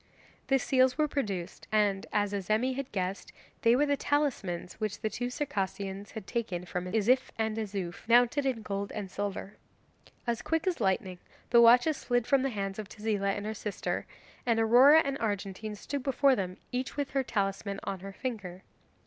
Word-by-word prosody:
The 270 - +4
seals 260 0 +3
were 305 -1 +3
produced, 200 - -4
and, 205 -2 +2
as 205 -1 +1
Azemi 215 +6 +1
had 275 -1 -5
guessed, 190 0 -3 0.3
they 230 -2 +5
were 290 +3 +3
the 285 -1 +2
talismans 245 - -1
which 215 -2 -3
the 215 -1 -1
two 245 +4 -2
Circassians 200 -7 -3
had 220 -3 -7
taken 190 -7 -3
from 180 0 -4
Izif 245 +5 +3
and 220 -1 0
Izouf, 200 -4 -4
mounted 245 +4 +4
in 235 -4 -1
gold 200 0 -3
and 200 -3 -5
silver. 200 0 -4 0.7
As 235 -2 -1
quick 325 +1 -1
as 360 -8 0
lightning 190 -2 0 0.3
the 235 -1 +7
watches 245 +6 +6
slid 245 -2 0
from 275 +1 +3
the 270 - 0
hands 195 -3 -4
of 210 - -6
Tezila 210 -2 -1
and 205 - -5
her 215 - -2
sister, 210 -1 -3 0.4
and 230 -2 +2
Aurora 255 +8 +7
and 275 0 -2
Argentine 210 0 -3
stood 280 +7 -4
before 270 +1 +3
them, 185 -3 -3
each 255 +3 -3
with 285 -2 -2
her 275 - +1
talisman 200 -3 -2
on 195 - -3
her 195 +2 -8
finger. 195 -5 -5
220 Hz, 180 wpm, -30 LUFS, 195-255 Hz, 0.7 s, the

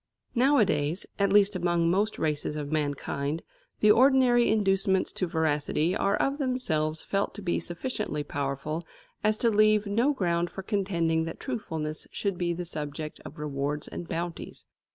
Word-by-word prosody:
Nowadays, 205 - +2
at 200 - +2
least 205 0 +5
among 175 -1 +1
most 205 +4 +1
races 150 -1 -1
of 145 -1 -4
mankind, 145 0 -2 0.4
the 210 - +7
ordinary 250 0 +5
inducements 195 -3 +2
to 185 - -2
veracity 160 +1 0
are 200 +1 +2
of 275 +2 0
themselves 160 - 0
felt 200 0 -1
to - - -7
be 175 - 0
sufficiently 175 - -3
powerful 145 +4 -3 0.4
as 215 0 +2
to 230 0 +2
leave 215 0 +4
no 230 +8 +2
ground 175 -8 0
for 195 - -7
contending 170 -6 0
that 165 - -6
truthfulness 160 - -4
should 195 -3 -3
be 175 -1 0
the 175 +1 -3
subject 150 -1 -5
of 155 - -10
rewards 145 0 -3
and 170 - -7
bounties. 170 0 -5
175 Hz, 155 wpm, -28 LUFS, 155-210 Hz, 0.4 s, the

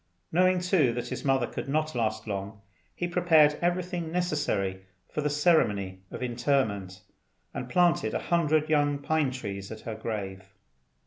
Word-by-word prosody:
Knowing, 185 +2 +4
too, 180 -8 +3
that 120 0 -4
his - - -5
mother 135 -3 +2
could 135 - -6
not 155 +2 0
last 110 -3 -1
long, 100 0 -5 0.4
he 175 - -2
prepared 160 -4 +4
everything 175 -1 -1
necessary 145 - -1 0.3
for 150 - -3
the 150 - 0
ceremony 105 - +2
of - - -6
interment, 120 -7 -1 0.5
and 125 - -5
planted 175 -10 +2
a - - -4
hundred 155 -2 +3
young 145 -2 +2
pine 145 0 +1
trees 100 -6 -6
at 110 -1 -8
her 115 - -5
grave. 95 -4 -5
140 Hz, 150 wpm, -28 LUFS, 110-160 Hz, 0.5 s, Knowing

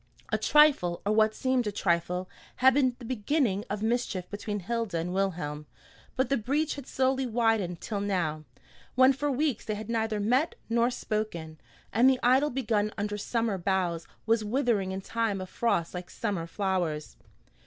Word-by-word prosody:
A - - +2
trifle, 290 - +4
or 205 - +2
what 215 0 +3
seemed 255 -3 +1
a - - 0
trifle, 180 -1 0 0.3
had 265 +1 +5
been 255 -2 +2
the 245 - -10
beginning 230 -3 0
of 205 +1 -3
mischief 220 -6 -1
between 205 0 -4
Hilda 230 -2 -2
and 170 +2 -2
Wilhelm, 160 -6 -2 0.5
but 260 -1 +1
the 275 - +2
breach 285 +7 0
had 280 -3 -8
slowly 265 0 +1
widened 225 -7 +1
till 210 -3 -3
now; 170 -7 -1 0.5
when 260 +2 +6
for 290 +2 -2
weeks 280 -3 0
they 215 - -3
had 215 +2 -6
neither 220 -2 0
met 250 +9 +1
nor 235 +1 +2
spoken, 210 -10 -4 0.3
and 240 +4 +6
the 260 -1 +2
idyl 265 +4 +4
begun 220 -5 0
under 210 0 -2
summer 220 -1 -1
boughs 175 -3 -1 0.2
was 225 0 +2
withering 215 -4 0
in 190 +1 -4
time 225 -1 -1
of 185 0 -7
frost 175 -8 0
like 180 -1 -6
summer 195 -7 -3
flowers. 175 -5 -2
215 Hz, 170 wpm, -28 LUFS, 190-245 Hz, 0.5 s, when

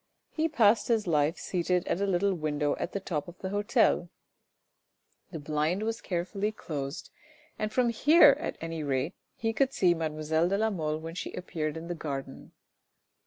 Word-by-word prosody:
He 320 +1 0
passed 225 -6 +4
his 225 -3 +2
life 155 -1 +2
seated 180 0 -1
at 185 - 0
a 200 - +1
little 195 +1 +2
window 150 -3 -1
at - - -3
the 200 - -2
top 160 -6 -3
of 175 +1 -11
the 190 - -5
hotel; 205 -3 +2 1.2
the 165 - -6
blind 155 +6 -1
was 225 +1 -2
carefully 195 +4 -2
closed, 145 -7 -6 0.5
and 215 0 -1
from 245 +1 +2
here 285 +4 +6
at - - -4
anyrate 155 -2 -2 0.2
he 225 0 -1
could 265 +4 +1
see 180 -7 +4
mademoiselle 160 +1 0
de 195 - +1
la 220 +1 +1
Mole 155 -5 -2
when 165 +1 -7
she 180 - -5
appeared 160 -4 -3
in 160 - -7
the 175 - -2
garden. 135 -4 -6
175 Hz, 170 wpm, -29 LUFS, 155-205 Hz, 1.2 s, here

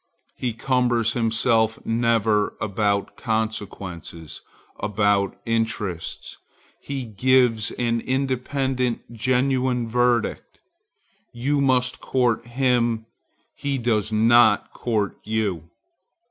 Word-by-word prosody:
He 125 -3 -2
cumbers 120 -1 +1
himself 115 -1 +1
never 115 -2 +1
about 100 -1 -1
consequences, 100 -7 -4 0.4
about 100 -2 +1
interests; 110 -6 -3 0.4
he 140 -2 -5
gives 120 0 +2
an 115 -1 0
independent, 130 -2 -1
genuine 130 +1 +1
verdict. 120 0 0 0.7
You 140 +4 0
must 130 -2 +2
court 120 -3 0
him; 120 -3 +1 0.5
he 140 -1 -2
does 110 -3 0
not 110 0 +4
court 110 -4 -2
you. 100 -7 -2
115 Hz, 85 wpm, -23 LUFS, 110-125 Hz, 0.7 s, not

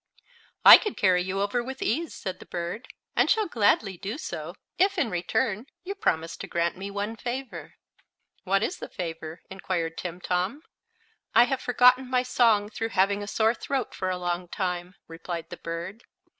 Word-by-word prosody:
"I - - +12
could 420 - -4
carry 185 -2 +4
you 190 +2 -2
over 240 +4 -1
with 265 +2 -7
ease," 320 +8 -1
said 185 -1 -5
the - - -13
bird, 175 +8 -5 0.3
"and - - +3
shall 435 -2 +3
gladly 205 - +2
do 205 +8 -5
so - - -6 0.2
if, 390 +1 +3
in 270 -10 +1
return, 210 +6 -1 0.2
you 385 +2 -4
promise 165 - -1
to - - -7
grant 170 0 0
me 195 +2 -6
one 205 +2 -3
favor." 245 +3 -6 0.7
"What 195 +1 +2
is - - -2
the - - -7
favor?" 165 -3 -6
inquired 170 -4 -3
Timtom. 180 - -2 0.7
"I 235 - +9
have 260 +2 -1
forgotten 250 +1 +4
my 250 -1 +2
song, 230 -5 +3
through 225 +1 -3
having 200 0 +2
a 205 - -6
sore 220 +2 +2
throat 265 0 -3
for 185 - -2
a 185 - -1
long 175 0 -2
time," 180 -1 -3
replied 165 0 -6
the - - -6
bird. 170 +6 -6
200 Hz, 175 wpm, -27 LUFS, 180-245 Hz, 0.7 s, I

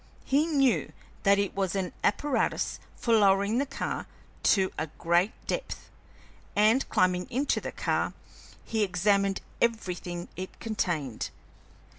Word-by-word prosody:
He 290 +4 +2
knew 260 - +2 0.3
that 200 0 +5
it 200 -1 0
was 195 -1 -1
an 185 -3 -2
apparatus 250 +2 +1 0.2
for 230 - 0
lowering 200 +1 +4
the 280 - 0
car 275 - -3 0.4
to 190 -3 +3
a 160 - -2
great 175 +5 +2
depth, - - -4 0.6
and, 220 +6 +4
climbing 180 0 +2
into 270 +4 0
the - - -4
car, - - -1 0.5
he 220 -1 -1
examined 195 +1 +2 0.2
everything 180 -6 -1
it 185 +1 -7
contained. 165 - -2
200 Hz, 125 wpm, -28 LUFS, 180-230 Hz, 0.6 s, that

